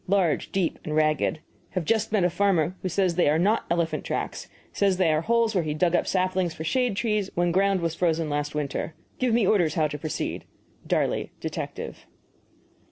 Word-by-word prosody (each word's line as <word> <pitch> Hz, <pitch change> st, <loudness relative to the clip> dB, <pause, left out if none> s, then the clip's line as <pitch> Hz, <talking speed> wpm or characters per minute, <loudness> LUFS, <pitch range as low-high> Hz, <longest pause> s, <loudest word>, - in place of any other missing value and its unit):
Large, 185 Hz, -6 st, +1 dB
deep, 190 Hz, -4 st, 0 dB
and 150 Hz, -, -3 dB
ragged. 155 Hz, 0 st, +1 dB, 0.3 s
Have 180 Hz, -3 st, -1 dB
just 220 Hz, +4 st, +1 dB
met 210 Hz, -4 st, +2 dB
a 180 Hz, -, +2 dB
farmer 180 Hz, -2 st, +2 dB
who 185 Hz, -, -2 dB
says 185 Hz, 0 st, +1 dB
they 170 Hz, -3 st, +3 dB
are 150 Hz, -, +3 dB
not 205 Hz, +7 st, +2 dB
elephant 170 Hz, -1 st, 0 dB
tracks. -, -, -3 dB, 0.3 s
Says 195 Hz, -2 st, +2 dB
they 170 Hz, -4 st, +3 dB
are 155 Hz, -, +1 dB
holes 230 Hz, +3 st, +2 dB
where 180 Hz, -4 st, +1 dB
he 150 Hz, -1 st, -2 dB
dug 175 Hz, +2 st, +2 dB
up -, -, +1 dB
saplings 185 Hz, -2 st, 0 dB
for 160 Hz, -, -6 dB
shade 245 Hz, +6 st, +1 dB
trees 210 Hz, -2 st, 0 dB
when 175 Hz, 0 st, +2 dB
ground 195 Hz, +1 st, +2 dB
was 165 Hz, -1 st, -1 dB
frozen 165 Hz, -2 st, 0 dB
last 145 Hz, 0 st, -2 dB
winter. 150 Hz, +2 st, -3 dB, 0.2 s
Give 255 Hz, -2 st, +1 dB
me 225 Hz, -2 st, +3 dB
orders 175 Hz, -7 st, +2 dB
how 155 Hz, -2 st, +2 dB
to 150 Hz, 0 st, -5 dB
proceed. 155 Hz, +1 st, -4 dB, 0.4 s
DARLEY, -, -, 0 dB
Detective. -, -, -6 dB
175 Hz, 195 wpm, -26 LUFS, 160-200 Hz, 0.4 s, they